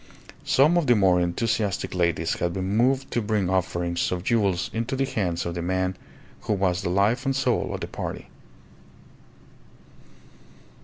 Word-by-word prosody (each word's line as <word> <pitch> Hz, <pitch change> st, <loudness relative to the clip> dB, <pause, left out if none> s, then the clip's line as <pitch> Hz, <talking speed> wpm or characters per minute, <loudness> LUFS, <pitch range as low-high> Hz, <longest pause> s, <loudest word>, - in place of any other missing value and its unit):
Some 150 Hz, +6 st, +4 dB
of 160 Hz, -, -2 dB
the 120 Hz, -, +5 dB
more 95 Hz, -4 st, +4 dB
enthusiastic 100 Hz, +3 st, -1 dB
ladies 85 Hz, -2 st, 0 dB
had 85 Hz, 0 st, -1 dB
been 95 Hz, +2 st, -2 dB
moved 130 Hz, +4 st, +2 dB
to 120 Hz, -, 0 dB
bring 105 Hz, -4 st, 0 dB
offerings 85 Hz, -2 st, -1 dB
of 90 Hz, -1 st, -2 dB
jewels 100 Hz, -5 st, +1 dB
into 115 Hz, +3 st, -2 dB
the 135 Hz, +1 st, +1 dB
hands 90 Hz, -9 st, -2 dB
of 85 Hz, -, -3 dB
the 85 Hz, -, -4 dB
man 95 Hz, +1 st, -1 dB, 0.5 s
who -, -, -1 dB
was 95 Hz, -3 st, 0 dB
the -, -, -2 dB
life 100 Hz, +8 st, +2 dB
and 135 Hz, -1 st, 0 dB
soul 130 Hz, -3 st, 0 dB
of -, -, -5 dB
the -, -, -3 dB
party. -, -, -6 dB
95 Hz, 160 wpm, -25 LUFS, 90-115 Hz, 0.5 s, the